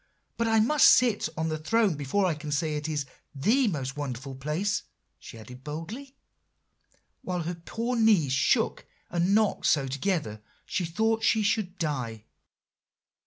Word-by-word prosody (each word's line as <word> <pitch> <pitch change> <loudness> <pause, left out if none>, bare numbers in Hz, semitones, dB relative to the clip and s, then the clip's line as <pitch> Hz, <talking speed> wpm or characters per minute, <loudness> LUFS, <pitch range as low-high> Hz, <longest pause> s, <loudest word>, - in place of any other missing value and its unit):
But 230 - 0
I 225 0 +3
must 280 +7 +6
sit 235 -9 +4
on 160 0 -1
that 155 0 -5
throne 225 -5 +3
before 145 +7 0
I 180 - +2
can 150 0 -7
say 155 +1 0
it 150 +1 -3
is 150 -3 -2 0.3
the 225 - +2
most 135 -7 -3
wonderful 135 -2 -5
place,' 155 +10 -1 0.4
she - - -11
added 125 +4 -12
boldly, 180 - -7 1.1
while 180 -2 -3
her 170 +2 -3
poor 230 +8 -4
knees 210 - +4
shook - - +1 0.2
and 175 +3 +2
knocked 215 -2 +2
so 140 -3 +3
together 140 - -2 0.2
she 185 - -2
thought 220 +6 0
she 220 -1 +3
should 200 -2 0
die. 125 - -3
165 Hz, 155 wpm, -27 LUFS, 145-215 Hz, 1.1 s, must